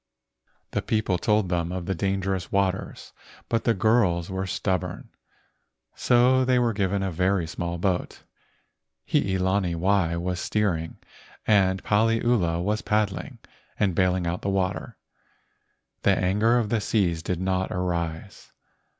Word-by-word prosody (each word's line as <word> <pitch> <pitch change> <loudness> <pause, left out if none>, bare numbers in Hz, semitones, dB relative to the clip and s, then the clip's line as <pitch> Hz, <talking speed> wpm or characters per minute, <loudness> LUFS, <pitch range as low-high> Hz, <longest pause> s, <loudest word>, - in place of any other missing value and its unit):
The - - -1
people 110 -5 0
told 105 -2 +1
them 85 -1 -1
of 90 -1 -4
the 95 - -1
dangerous 95 0 -2
waters, 95 -1 -2 0.4
but 115 -1 0
the 115 - +3
girls 95 -5 +2
were 95 0 -2
stub¬ 95 0 0
born, 90 -1 -8 0.8
so 125 +2 +3
they 130 0 +2
were 120 -2 +2
given 100 -1 0
a 95 - -1
very 90 +1 +1
small 85 +1 -4
boat. 90 0 -2 0.8
Hii 95 -1 +1
lani 95 -1 +1
wai 90 -1 +1
was 90 +1 -2
steering, 90 -6 -1 0.5
and 95 -3 +3
Paliula 110 -5 +2
was 105 +3 0
pad¬ 105 -1 +1
dling 95 - -8 0.4
and 100 -3 +2
bailing 90 +1 +1
out 85 +1 -2
the 100 - -2
water. 95 -3 -2 1.0
The - - +3
anger 105 +6 +2
of 115 -4 0
the 115 -1 0
seas 90 -6 0
did 85 +1 -3
not 95 0 -1
arise. 85 -3 -4
95 Hz, 140 wpm, -25 LUFS, 90-105 Hz, 1.0 s, the